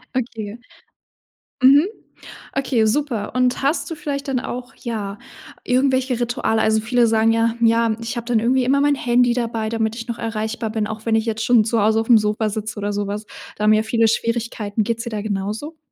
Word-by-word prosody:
Okay. 225 -3 -4 1.0
Mhm. 280 +5 +7 0.7
Okay, 260 -5 +1
super 235 -3 -1
und 250 0 +1
hast 285 +6 0
du - - -3
vielleicht 285 -1 -4
dann 260 -2 0
auch, 250 -1 -6
ja, 210 -3 -5 0.4
irgendwelche 260 -1 +1
Rituale? 240 -2 0
Also, 220 0 +2
viele 240 +1 +2
sagen 225 0 +3
ja: 230 0 +2
„Ja, 230 -1 +3
ich 230 +1 -4
habe 235 - -4
dann 235 -2 +2
irgendwie 250 +3 +2
immer 280 +2 +3
mein 290 0 +3
Handy 245 -1 +2
dabei, 230 -2 -2
damit 225 -1 -1
ich 230 +1 -7
noch 235 - -4
erreichbar 220 0 -3
bin, 215 -1 -1
auch 220 0 -7
wenn 225 - +1
ich 220 - +1
jetzt 225 -1 -2
schon 240 -3 +5
zu 230 0 +1
Hause 220 +1 +3
auf 225 - -7
'm 230 - +8
Sofa 210 +1 0
sitze 215 0 -5
oder 205 0 -2
so 205 0 -1
was.“ 210 +1 -4 0.3
Da 210 - -4
haben 215 - +6
ja 215 +1 +3
viele 225 0 +2
Schwierigkeiten. 230 -2 -1
Geht 230 +1 -1
es - - -3
dir - - -3
da 210 -1 -3
genauso? 215 +10 -4
230 Hz, 205 wpm, -21 LUFS, 220-245 Hz, 1.0 s, m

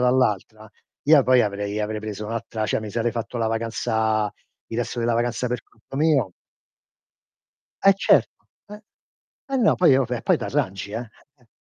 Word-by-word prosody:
dall'altra, 110 -4 +1 0.3
io 150 -1 +6
poi 130 -1 +4
avrei 105 0 -2
avrei 105 0 -2
preso 105 0 -6
un'altra 110 -1 -3
cioè - - 0
mi 110 -1 -6
sarei 120 +1 0
fatto 115 0 -5
la 115 - +1
vacanza 110 -1 0 0.3
il 115 - -6
resto 120 0 -2
della 115 0 +1
vacanza 120 +1 -1
per 125 -1 -2
conto 115 +4 -13
mio. 140 - +2 1.5
Eh 195 0 +7
certo. 195 - +2 1.1
Eh 270 - +2
no, 230 -5 +4
poi 165 -7 +5
oh 135 -3 +1
eh, 120 -2 -2
poi - - +3
t'arrangi 95 +1 -2
eh, 110 - -2
eh-eh. 125 +3 -14
115 Hz, 160 wpm, -23 LUFS, 110-125 Hz, 1.5 s, Eh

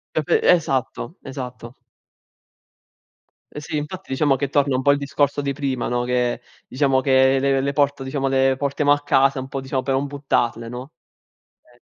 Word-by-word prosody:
Proprio - - +1
esatto, 150 - +1
esatto. 125 -2 -8 1.8
Eh 150 - -7
sì 150 0 -4
infatti 150 +1 -6
diciamo 135 +1 +2
che 135 +1 -2
torna 140 -2 +1
un 130 - -1
po' 140 - +5
il 145 - +1
discorso 145 0 0
di 140 0 -2
prima, 135 -3 -2
no, 120 0 -1
che 125 -1 0 0.3
diciamo 135 0 +1
che 130 0 +4
le 135 0 +1
le 140 +1 -1
porto 140 -1 +1
diciamo 135 0 -2
le 135 0 +2
portiamo 140 +1 +1
a 145 0 +3
casa 135 -1 +2
un 130 - -6
po', 135 - -4
diciamo, 130 0 -2
per 130 +1 -1
non 135 - 0
buttarle, 120 -5 -1
no, 125 +4 -8 0.7
eh. 120 0 -26
135 Hz, 175 wpm, -21 LUFS, 130-145 Hz, 1.8 s, po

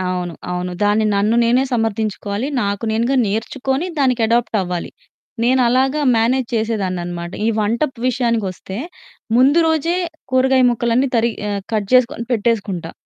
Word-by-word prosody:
అవును. 180 -2 -3 0.2
అవును. 180 0 -3
దాన్ని 210 +1 +3
నన్ను 210 +3 +2
నేనే 245 +3 +3
సమర్థించుకోవాలి. 220 0 -1 0.2
నాకు 200 +2 -2
నేనుగా 235 +5 +1
నేర్చుకొని, 265 - -2
దానికి 255 -3 +2
అడాప్టవ్వాలి. 210 -6 -1 0.5
నేను 255 +2 +3
అలాగా 265 +4 +2 0.2
మ్యానేజ్ 240 +2 +1
చేసేదాన్ననమాట. 185 -6 -2 0.2
ఈ - - +3
వంటపు 235 +5 -1
విషయాకొస్తే 230 -7 -2 0.6
ముందు 270 +6 +5
రోజే 320 +2 +1 0.4
కూరగాయ 260 0 +4
ముక్కలన్నీ 240 +3 +1
తరిగి 230 0 0
ఆహ్, 200 -1 -3
కట్ 210 -3 -1
జేసుకొని 250 -1 +3
పెట్టేసుకుంటా. 205 -7 -1
230 Hz, 125 wpm, -19 LUFS, 200-255 Hz, 0.6 s, ముందు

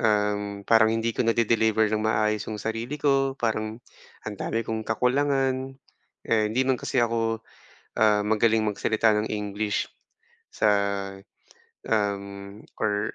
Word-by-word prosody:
Um, 105 -2 0
parang 110 0 +5
hindi 115 +1 0
ko - - -4
nade-deliver 110 -1 +2
ng 110 - +1
maayos 110 -1 0
'yong 110 - -4
sarili 115 +6 -4
ko, 135 -2 +1
parang 110 -2 -2 0.5
ang 105 -2 -5
dami 115 0 -1
kong 110 0 -3
kakulangan. 130 +3 0 0.5
Eh, 110 -2 +2
hindi 125 +5 +1
man 130 -1 +1
kasi 120 -2 +1
ako, 115 -1 -1 0.6
ah, 105 -1 +4
magaling 110 +1 +2
magsalita 110 +1 +2
ng 110 - -4
english 105 0 -2 0.7
sa, 110 - +2 1.2
um, 100 -1 -2 0.2
or 105 0 0
110 Hz, 130 wpm, -26 LUFS, 105-115 Hz, 1.2 s, parang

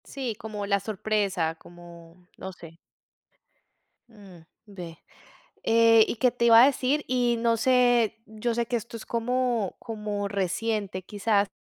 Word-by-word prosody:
Sí, 255 -5 -5
como 210 -1 -6
la 200 0 +1
sorpresa, 195 -5 -1
como 170 +1 -16
no 190 - -7
sé. 165 -2 -14 1.3
Mm, 200 -6 -15 0.2
ve, 180 -6 -10 0.6
eh, 225 -1 +5
¿y - - -3
qué 250 +3 +3
te 235 -1 -1
iba 230 0 +8
a - - +8
decir? 280 +1 0
Y 245 -2 +1
no 230 0 +1
sé, 245 -2 +2
yo 220 +2 -3
sé, 235 0 -1
que 240 - -1
esto 235 +1 -6
es, 225 - -10
como 240 -3 -1
como 210 -3 -4
reciente 200 0 -2
quizás, 205 +1 0
220 Hz, 145 wpm, -26 LUFS, 195-235 Hz, 1.3 s, iba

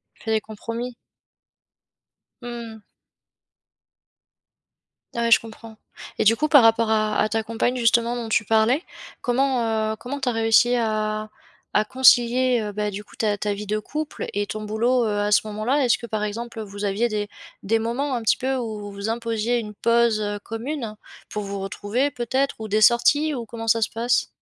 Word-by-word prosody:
Tu - - -20
fais 220 - -1
des 220 - +2
compromis? 230 +3 -6 1.5
Mmh 245 - -8 0.3
mh. 220 - -15 2.3
Ouais, 235 0 0
je - - +8
comprends 225 0 -12 0.4
et - - +2
du 225 +2 +6
coup 305 +5 -1
par 285 -4 +8
rapport 225 0 +4
à 215 -1 +1
à 215 - +2
ta 225 +1 0
compagne, 230 +3 -1
justement 235 0 +2
dont 235 -2 -4
tu 220 - +2
parlais, 225 - +2 0.4
comment, 240 -4 +1
heu, - - -5
comment 250 +6 -6
tu 270 - -3
as - - +1
réussi 225 +2 +4
à 215 -2 -1 0.4
à 215 - +3
concilier, 245 -2 +4
ben 210 0 -1
du 205 +2 -6
coup, - - -18
ta 210 -2 0
ta 205 0 -1
vie 210 +1 -6
de 215 +1 0
couple 300 +7 -5
et 205 0 -1
ton 215 0 -5
boulot, 235 +3 +1
heu, 205 -1 -1
à 205 0 0
ce 210 - +5
moment-là? 220 +7 0
Est-ce 235 - +3
que 235 - -9
par 215 -1 -2
exemple 230 +2 -5
vous 205 -1 -7
aviez 205 +4 +1
des 210 -2 -3 0.3
des 225 +3 +1
moments 250 +4 -1
un 235 - -2
petit 220 - +2
peu 265 +1 -1
où 215 -4 -5
vous 200 +2 -5
imposiez 230 0 -1
une 210 -2 -7
pause, 230 0 +2
heu, 205 0 -3
commune 230 -1 -5 0.3
pour 210 - -4
vous 200 0 -5
retrouver 205 +8 -1
peut-être? 260 +3 -1
Ou 220 - -5
des 215 +1 +1
sorties 290 +7 +4
ou 240 -4 -4
comment 225 +1 -7
ça 230 0 +3
se - - +1
passe? 235 +2 0
225 Hz, 190 wpm, -23 LUFS, 215-240 Hz, 2.3 s, je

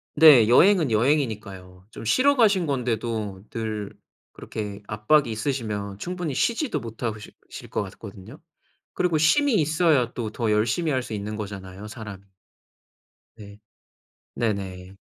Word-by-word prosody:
네. 145 -8 +8
여행은 170 - +5
여행이니까요. 105 -7 -1
좀 - - -9
쉬러 265 - +3
가신 205 -7 +3
건데도 115 -7 -2
늘 110 -3 -4 0.4
그렇게 105 -1 -7
압박이 115 +6 +2
있으시면 110 -5 -3
충분히 175 - -4
쉬지도 235 - 0
못하고 115 -1 -5
실 - - -12 0.2
실 - - -10
것 - - -2
같거든요. 100 0 -11 0.5
그리고 175 -3 +1
쉼이 280 - +3
있어야 155 -5 +2
또 110 -3 -4
더 115 -2 -1
열심히 115 +10 +1
할 130 -2 0
수 115 - -7
있는 105 +1 -4
거잖아요 100 -1 -7
사람이. 105 -3 -9 1.1
네. 105 -1 -13 0.8
네네. 95 -4 -3
110 Hz, 285 characters per minute, -24 LUFS, 105-150 Hz, 1.1 s, 네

